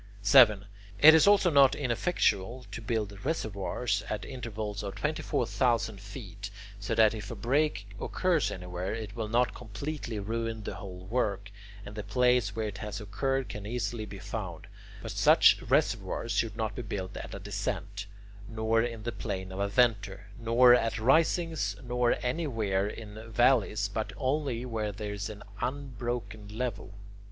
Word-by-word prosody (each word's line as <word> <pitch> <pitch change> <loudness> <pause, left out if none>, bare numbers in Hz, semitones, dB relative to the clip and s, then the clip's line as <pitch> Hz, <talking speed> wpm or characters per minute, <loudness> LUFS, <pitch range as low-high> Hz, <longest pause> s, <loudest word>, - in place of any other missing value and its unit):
7. 105 -2 +7 0.3
It 160 +2 +10
is 160 +3 +6
also 200 -3 +5
not 140 -3 +6
ineffectual 125 - 0
to 100 - -6
build 105 -3 -3
reservoirs 110 -6 -1
at 105 -1 -3
intervals 110 -5 -5
of 100 -1 -5
24,000 125 - 0
feet, 100 -1 -8 0.3
so 100 - -2
that 110 -1 +5
if 105 -2 -6
a - - -5
break 135 -5 0
occurs 180 -5 +1
anywhere, 90 +2 -4
it 110 -2 -6
will 110 -2 -3
not 120 +3 +2
completely 120 +2 -5
ruin 115 +1 -3
the - - -4
whole 90 -2 -9
work, 100 -3 -1 0.3
and 100 - -8
the 105 - -4
place 120 0 +2
where 110 -1 -1
it 100 -1 -7
has 105 -1 -5
occurred 135 +6 -1
can 105 -1 -7
easily 120 -1 -3
be - - -8
found; - - -6 0.4
but - - -5
such - - +5
reservoirs 115 - 0
should 115 -2 0
not 110 -1 -2
be 110 - -5
built 100 -4 -5
at - - -7
a - - -6
descent, 100 +1 -4 0.4
nor 110 0 +1
in 115 -2 -3
the 120 - -2
plane 95 -3 -5
of 95 - -6
a 100 - +1
venter, 105 -3 +1
nor 120 +2 +6
at 115 -2 +2
risings, 160 +7 +2
nor 125 0 +1
anywhere 115 - 0
in 110 +1 -8
valleys, 110 -3 +3
but 105 0 -4
only 130 -2 -1
where 110 -3 -2
there 105 0 -5
is 100 +1 -4
an 105 -1 -9 0.2
unbroken 120 -5 -4
level. 110 -2 -4
110 Hz, 160 wpm, -29 LUFS, 100-125 Hz, 0.4 s, It